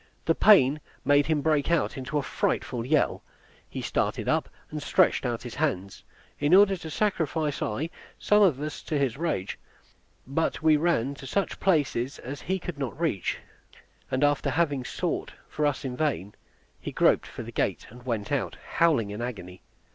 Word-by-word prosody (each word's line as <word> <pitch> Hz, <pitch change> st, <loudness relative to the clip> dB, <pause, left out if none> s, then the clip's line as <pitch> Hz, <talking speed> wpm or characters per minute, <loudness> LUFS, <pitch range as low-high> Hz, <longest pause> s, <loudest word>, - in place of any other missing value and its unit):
The 165 Hz, -, +4 dB
pain 155 Hz, -8 st, +5 dB, 0.2 s
made 145 Hz, +1 st, +4 dB
him 155 Hz, -3 st, +1 dB
break 155 Hz, -2 st, +2 dB
out 170 Hz, -2 st, +1 dB
into 135 Hz, +2 st, -3 dB
a 145 Hz, -, 0 dB
frightful 120 Hz, -2 st, -1 dB
yell: 145 Hz, +5 st, +1 dB, 0.5 s
he -, -, -5 dB
started -, -, -1 dB
up, -, -, +1 dB, 0.2 s
and 150 Hz, -1 st, -4 dB
stretched 140 Hz, -, +3 dB
out 120 Hz, -1 st, -3 dB
his 120 Hz, -2 st, -7 dB
hands, 110 Hz, -10 st, -2 dB, 0.4 s
in 145 Hz, +5 st, +4 dB
order 195 Hz, 0 st, +6 dB
to 170 Hz, -3 st, -8 dB
sacrifice 160 Hz, -5 st, -1 dB
I 145 Hz, +10 st, -2 dB, 0.3 s
some 210 Hz, 0 st, +3 dB
of 170 Hz, -10 st, +4 dB
us 150 Hz, +1 st, -5 dB
to 155 Hz, -, -2 dB
his 135 Hz, -5 st, 0 dB
rage; 145 Hz, -, -2 dB, 0.7 s
but 155 Hz, +4 st, -1 dB
we 155 Hz, -1 st, +6 dB
ran 150 Hz, -5 st, +1 dB
to 135 Hz, -1 st, -10 dB
such 200 Hz, +9 st, -1 dB
places 145 Hz, -7 st, +1 dB
as 140 Hz, +3 st, -7 dB
he 190 Hz, +1 st, -1 dB
could 175 Hz, -5 st, -7 dB
not 135 Hz, +1 st, -4 dB
reach; 155 Hz, -, 0 dB, 0.7 s
and 130 Hz, +2 st, 0 dB
after 145 Hz, -1 st, +2 dB
having 145 Hz, -5 st, +1 dB
sought -, -, -3 dB
for 150 Hz, -1 st, 0 dB
us 145 Hz, -1 st, -2 dB
in 125 Hz, -2 st, -3 dB
vain, 120 Hz, -, -1 dB, 0.5 s
he -, -, -6 dB
groped -, -, +3 dB
for -, -, -7 dB
the -, -, -8 dB
gate, -, -, -1 dB
and 125 Hz, +1 st, -13 dB
went 115 Hz, -3 st, -3 dB
out, 140 Hz, -2 st, -1 dB, 0.2 s
howling 145 Hz, -12 st, +3 dB
in 105 Hz, +3 st, -5 dB
agony. 95 Hz, -7 st, -6 dB
145 Hz, 180 wpm, -27 LUFS, 125-160 Hz, 0.7 s, order